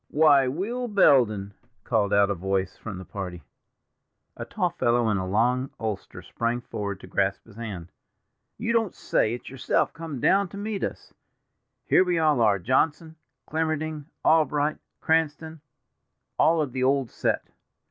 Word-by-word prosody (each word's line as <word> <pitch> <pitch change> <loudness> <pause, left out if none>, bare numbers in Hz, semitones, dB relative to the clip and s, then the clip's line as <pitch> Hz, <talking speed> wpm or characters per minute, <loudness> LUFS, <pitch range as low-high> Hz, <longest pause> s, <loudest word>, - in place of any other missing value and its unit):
"Why, 145 -3 +5
Will 215 - -2
Belden!" 120 - +3 0.3
called 105 -5 +1
out 100 0 +4
a - - +2
voice 95 +1 -2
from 105 -4 -7
the 95 - -8
party. 90 -3 -6 0.9
A - - -6
tall - - -1
fellow 120 0 +1
in 105 - +1
a 95 0 -3
long 125 +6 +1
ulster 110 -3 -5
sprang 115 +1 -2
forward 100 -4 -5
to - - -10
grasp - - -1
his - - -17
hand. 100 -7 -7 0.7
"You 235 +1 -1
don't 225 -5 +1
say 110 +2 0
it's 120 - -11
yourself 135 -1 0
come 165 -5 -6
down 195 +9 +3
to 200 - -9
meet 205 0 -3
us. - - -5 0.7
Here - - +5
we 180 -2 0
all 155 -6 +3
are, 105 -3 +4
Johnson, 145 - 0 0.3
Clemmerding, 155 -1 -2 0.2
Albright, 150 -1 +2 0.2
Cranston—all 160 0 0 1.0
of 140 - -5
the 130 - -2
old 135 -2 +1
set. - - -1
130 Hz, 150 wpm, -26 LUFS, 105-160 Hz, 1.0 s, Why